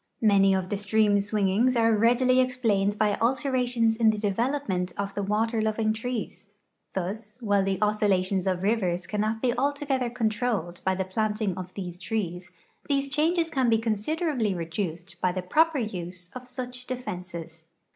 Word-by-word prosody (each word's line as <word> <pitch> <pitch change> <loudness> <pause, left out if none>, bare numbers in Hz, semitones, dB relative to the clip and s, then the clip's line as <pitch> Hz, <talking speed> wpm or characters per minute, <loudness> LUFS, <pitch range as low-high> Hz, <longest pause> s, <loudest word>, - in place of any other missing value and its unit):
Many 195 -2 +5
of 185 -1 -2
the 205 - -1
stream 210 0 +3
swingings 210 +4 +2
are 225 -1 +4
readily 245 +4 +4
ex 255 0 -1
plained 205 -4 +1
by 210 -1 +2
alternations 245 -2 +1
in 225 -1 +4
the 215 - +1
development 205 -2 -1
of 200 0 -3
the 205 - -2
water 220 +3 0
loving 215 0 +1
trees. 230 -2 -5 0.5
Thus, 210 +4 -4
while 205 -4 +2
the 195 0 0
oscillations 195 -3 +1
of 185 -1 0
rivers 185 -5 0
cannot 215 +4 -2
be 245 -1 +2
altogether 275 -1 0
controlled 220 -6 -1
by 190 0 +1
the 190 0 -2
planting 210 0 -1
of 185 -1 -8
these 180 -3 -6
trees, 180 -5 -3 0.4
these 275 -1 +1
changes 325 +3 +1
can 260 -3 +2
be 225 - +4
considerably 225 - -1
reduced 170 +1 -4
by 180 - +2
the 185 0 -4
proper 315 - +3
use 180 -6 -5
of 255 0 -8
such 250 0 -7
defenses. 175 -9 -6
215 Hz, 160 wpm, -27 LUFS, 190-245 Hz, 0.5 s, Many